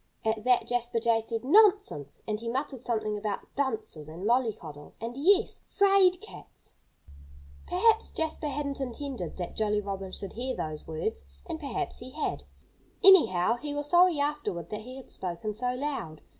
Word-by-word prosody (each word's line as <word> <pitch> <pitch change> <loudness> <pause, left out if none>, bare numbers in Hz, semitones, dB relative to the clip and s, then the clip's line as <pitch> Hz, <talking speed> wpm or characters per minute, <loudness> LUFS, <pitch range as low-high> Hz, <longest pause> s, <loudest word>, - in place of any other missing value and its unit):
At 220 -1 0
that 250 -1 +4
Jasper 240 -1 0
Jay 230 0 +2
said, 225 +1 -4
"Nonsense!" 395 - +3
And 210 -1 -1
he 230 +1 -4
muttered 265 +2 -2
something 220 -3 -1
about 205 -1 -3
dunces, 220 - -2
and 170 +5 -7
mollycoddles, 210 - -1
and 230 +2 -5
yes! 390 +9 +3
'fraid 390 -3 +4
cats! 435 - -13 0.9
Perhaps 440 +5 +3
Jasper 320 -1 -3
hadn't 280 -1 -3
intended 255 - -5
that 175 -2 -5
Jolly 210 -1 +1
Robin 195 -2 -5
should 195 -1 -6
hear 255 +3 -3
those 155 -1 -5
words 160 +8 -3 0.2
and 330 -2 -5
perhaps 280 -6 -3
he 245 - -8
had. - - -2 0.6
Anyhow, 235 - +6
he 290 +3 -5
was 290 0 -2
sorry 350 -3 +6
afterward 285 - -2
that 210 0 -4
he 255 +4 -9
had 265 - -11
spoken 185 +4 -4
so 250 +3 -1
loud. 255 - -4
240 Hz, 160 wpm, -29 LUFS, 210-295 Hz, 0.9 s, Anyhow